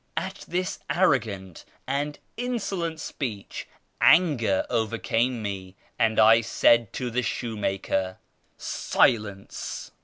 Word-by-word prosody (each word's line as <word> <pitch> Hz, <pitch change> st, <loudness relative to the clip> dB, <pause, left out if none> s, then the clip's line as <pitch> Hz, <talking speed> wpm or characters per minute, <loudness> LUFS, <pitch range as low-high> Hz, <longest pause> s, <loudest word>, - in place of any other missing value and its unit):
" -, -, -32 dB
At -, -, -4 dB
this 185 Hz, +2 st, -2 dB
arrogant 110 Hz, -, 0 dB, 0.2 s
and 145 Hz, +2 st, -2 dB, 0.2 s
insolent 195 Hz, -9 st, -2 dB
speech 115 Hz, -10 st, -5 dB, 0.3 s
anger 130 Hz, -, +4 dB
overcame 115 Hz, +1 st, 0 dB
me, 95 Hz, -2 st, -5 dB, 0.2 s
and 110 Hz, -1 st, +2 dB
I 110 Hz, +1 st, +7 dB
said 115 Hz, 0 st, +3 dB
to 125 Hz, -2 st, -3 dB
the 125 Hz, +2 st, +1 dB
shoemaker 95 Hz, -5 st, -2 dB, 0.2 s
— -, -, -44 dB
" -, -, -41 dB, 0.3 s
Silence 105 Hz, -4 st, 0 dB
115 Hz, 115 wpm, -26 LUFS, 100-145 Hz, 0.3 s, I